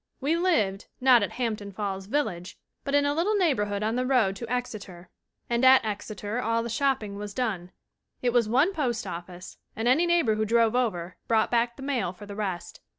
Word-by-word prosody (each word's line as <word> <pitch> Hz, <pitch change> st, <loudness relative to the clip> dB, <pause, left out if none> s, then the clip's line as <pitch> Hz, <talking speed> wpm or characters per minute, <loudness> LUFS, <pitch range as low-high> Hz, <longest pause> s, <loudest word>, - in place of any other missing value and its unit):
We 290 Hz, +5 st, +1 dB
lived, 225 Hz, -, +1 dB
not 250 Hz, -2 st, +6 dB
at 205 Hz, -, -2 dB
Hampton 215 Hz, -5 st, -3 dB
Falls 195 Hz, -1 st, -4 dB
village, 210 Hz, -9 st, -2 dB, 0.3 s
but 280 Hz, -, -1 dB
in 285 Hz, 0 st, +4 dB
a 285 Hz, -, +1 dB
little 355 Hz, +8 st, +1 dB
'neighbor 290 Hz, -, +2 dB
hood' 205 Hz, 0 st, -3 dB
on 220 Hz, +2 st, 0 dB
the 255 Hz, -, 0 dB
road 230 Hz, -8 st, +2 dB
to 235 Hz, -1 st, -7 dB
Exeter, 210 Hz, -8 st, -5 dB, 0.4 s
and 235 Hz, +1 st, 0 dB
at 260 Hz, -2 st, +7 dB
Exeter 210 Hz, +2 st, -4 dB
all 230 Hz, 0 st, 0 dB
the 235 Hz, -, -4 dB
shopping 230 Hz, -5 st, -1 dB
was 205 Hz, 0 st, -7 dB
done. 195 Hz, -8 st, -2 dB, 0.5 s
It 245 Hz, -1 st, +1 dB
was 235 Hz, -3 st, +3 dB
one 280 Hz, -, +3 dB
postoffice, 185 Hz, -, -4 dB, 0.2 s
and 225 Hz, +2 st, -2 dB
any 310 Hz, +8 st, +4 dB
neighbor 340 Hz, -10 st, +3 dB
who 215 Hz, 0 st, 0 dB
drove 230 Hz, +1 st, +2 dB
over 185 Hz, -8 st, -1 dB
brought 220 Hz, -1 st, +2 dB
back 235 Hz, 0 st, +1 dB
the 270 Hz, -, -10 dB
mail 245 Hz, -10 st, -1 dB
for 195 Hz, +3 st, -12 dB
the 200 Hz, 0 st, -8 dB
rest. 195 Hz, -4 st, -4 dB
230 Hz, 200 wpm, -27 LUFS, 205-260 Hz, 0.5 s, at